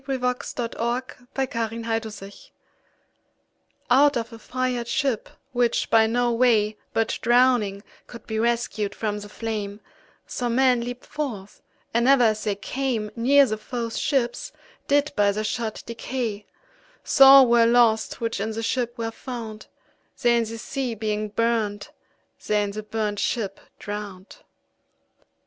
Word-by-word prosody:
202919A 270 -1 -3 1.2
Burnt 265 -1 -1
ShipJohn 225 -1 -3
Donne 195 +1 -9 1.6
Out 280 +1 +5
of 230 0 -4
a 225 - -10
fired 250 0 -2
ship, 255 -2 -1 0.2
which, 245 -1 0
by 225 -1 +5
no 240 +1 +1
way 225 -3 +3 0.2
But 225 0 -1
drowning, 240 -5 +3 0.2
could 235 -2 -11
be 220 -1 -3
rescued 230 -3 -1
from 210 -2 -2
the 205 0 -10
flame, 210 -2 -4 0.5
Some 240 -2 -2
men 255 -2 +4
leap'd 245 +1 -6
forth, 230 -10 -6 0.3
and 235 +2 +2
ever 270 -2 +6
as 215 -1 +1
they 205 -2 0
came 225 0 -3
Neere 275 +4 +5
the 215 -4 -3
foes 230 0 -4
ships, 245 -4 -1 0.4
did 285 +1 +2
by 205 -1 +3
their 215 +1 -2
shot 220 0 -3
decay; 230 -2 -4 0.6
So 275 - +5
all 270 -1 +9
were 235 -1 +5
lost, 230 -2 +3
which 230 -3 -2
in 220 - -1
the 225 +1 -4
ship 240 0 -1
were 225 -1 -3
found, 225 -3 -8 0.5
They 240 -2 +3
in 235 -1 +2
the 225 +1 -6
sea 250 +1 -3
being 215 0 -2
burnt, 215 -2 -1 0.6
they 210 0 +2
in 200 - -3
the 215 +1 -5
burnt 210 -1 -3
ship 205 -5 -2 0.2
drown'd. 205 -2 -7
230 Hz, 145 wpm, -24 LUFS, 215-245 Hz, 1.6 s, all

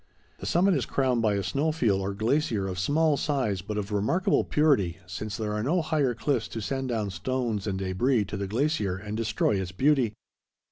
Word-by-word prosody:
The - - -6
summit 185 +3 +3
is 140 -7 0
crowned 130 -3 +1
by 105 -2 +2
a 100 - -1
snow 140 - 0
field 110 -11 +1
or 100 +1 -3
glacier 110 -2 0
of 90 -1 -4
small 150 - +2
size 130 - 0
but 105 +3 -5
of 105 0 -3
remarkable 110 - +2
purity, 130 - +2
since 100 +3 -5
there 105 -1 -2
are 105 - -1
no 160 +9 +1
higher 145 -5 +1
cliffs 125 -1 0
to - - -6
send 135 +4 -3
down 110 -4 -1
stones 110 +2 -2
and 95 -2 -1
debris 100 +5 +1
to 100 - -6
the 100 0 -3
glacier 110 - 0
and 105 +2 -6
destroy 110 -3 +1
its 90 -1 -5
beauty. 130 +2 +2
110 Hz, 200 wpm, -27 LUFS, 100-140 Hz, -, summit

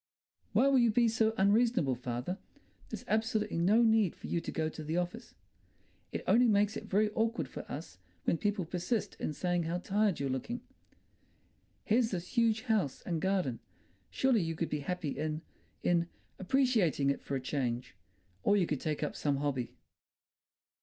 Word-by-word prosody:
"Why 270 - +5
will 275 -2 +5
you 235 -1 +5
be 235 +2 +4
so 220 0 +2
unreasonable, 205 - +3
father? 125 - -4 0.5
There's - - -6
absolutely 215 -4 0
no 210 +7 +5
need 220 -5 +3
for - - -11
you 170 - -1
to - - -5
go 160 -1 -1
to 155 0 -6
the 160 +3 -2
office. 180 0 -4 0.8
It - - -4
only 245 +2 +5
makes 210 0 +3
it - - -5
very 210 +2 +2
awkward 225 +2 0
for - - -8
us - - -7 0.2
when 165 - +1
people 205 -3 0
persist 190 +5 -2
in - - -2
saying 175 +2 -1
how 170 +2 -1
tired 200 0 +1
you're 140 - -1
looking. 215 - -3 1.2
Here's 230 +1 +3
this 180 -3 -4
huge 230 -2 +2
house 215 - 0
and 170 -3 -2
garden. 185 -11 0 0.5
Surely 260 -5 +2
you 165 -1 -2
could - - -2
be 150 - -1
happy 165 +1 -3
in—in—appreciating 170 - 0
it 140 - -4
for 140 - -4
a - - 0
change. 125 -2 -2 0.5
Or 205 - +3
you 185 - +3
could 150 -5 -2
take 155 -2 -2
up - - -2
some 145 -2 0
hobby." 135 -4 -2
185 Hz, 165 wpm, -32 LUFS, 155-220 Hz, 1.2 s, Why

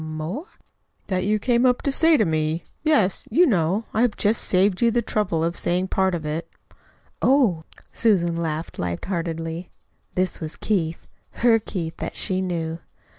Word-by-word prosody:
"M 155 0 -6
more?" 190 - -4 0.6
"That 185 -1 0
you 210 +1 +2
came 240 +2 +2
up 250 -1 +3
to 280 - +1
say 320 +3 +4
to 215 - +3
me 160 0 -1 0.2
yes. 295 -12 +2
You 355 +3 +5
know 195 - +1
I 220 - +1
have 245 -3 +2
just 215 +2 +1
saved 185 +1 +2
you 235 - +5
the 235 +1 +1
trouble 185 -7 0
of 170 +1 -1
saying 180 +2 -1
part 190 -1 +1
of 160 -3 -5
it." 155 +2 -3 0.7
"Oh!" 230 - +3 0.3
Susan 180 -7 +2
laughed 160 -1 -3
light 85 -1 -3
heartedly. 165 -1 -3 0.5
(This 185 0 0
was 155 -1 -5
Keith 170 -6 -2 0.4
her 230 -2 +6
Keith 170 -6 -5
that - - -5
she 185 0 +1
knew.) 165 -3 -3
185 Hz, 175 wpm, -23 LUFS, 165-220 Hz, 0.7 s, her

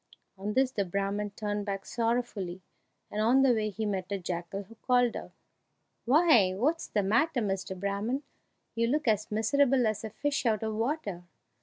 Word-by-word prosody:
On 200 +2 -4
this 260 +1 +3
the 205 - 0
Brahman 200 +2 -2
turned 205 -1 -2
back 195 -1 -3
sorrowfully, 225 -6 -2 0.5
and 210 - -1
on 250 +5 +5
the 260 -2 +5
way 215 -2 0
he 215 +2 -4
met 195 -2 -3
a 200 - 0
jackal, 180 +1 -4
who 210 +4 -15
called 245 +1 +2
out, - - -6 0.8
"Why, 245 - +5
what's 300 - 0
the 205 - 0
matter, 245 +8 +2
Mr. 195 -3 -2
Brahman? 205 +8 -1 0.5
You 230 0 +1
look 300 +3 0
as 215 -2 +2
miserable 250 +4 +3
as 215 -1 -1
a 220 - -4
fish 280 +3 -1
out 220 -1 +1
of 220 0 -2
water!" 220 - -2
215 Hz, 175 wpm, -29 LUFS, 200-245 Hz, 0.8 s, on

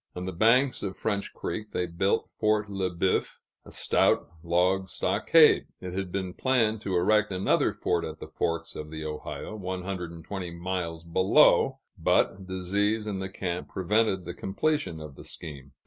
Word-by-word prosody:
On 90 0 -4
the 95 - -3
banks 120 +8 +3
of 95 -2 -4
French 100 -2 -2
Creek 105 0 -5
they 90 - 0
built 90 +3 0
Fort 105 -1 0
Le 95 -2 -1
Boeuf, 90 +2 0 0.3
a - - -12
stout - - +2
log 90 +3 +1
stockade. - - +4
It 90 -1 -6
had 95 -1 -3
been 95 -1 -3
planned 115 -4 +1
to 95 -3 -2
erect 105 +4 +3
another 95 +1 +2
fort - - -1
at - - -6
the - - -8
Forks 85 0 -2
of 75 0 -7
the 80 0 -6
Ohio, 75 +7 -5
one 95 -2 -4
hundred 90 -2 -4
and 85 -2 -11
twenty 95 -3 -4
miles 85 -1 -4
below; 90 +3 +4 0.2
but 95 -1 +2
disease 100 +4 0
in 100 -3 -3
the 95 0 -4
camp 90 -2 -4
prevented 95 0 +1
the 85 - -5
completion 145 - -1
of 75 -2 -8
the - - -12
scheme. 70 -4 -8
95 Hz, 175 wpm, -28 LUFS, 85-105 Hz, 0.3 s, stockade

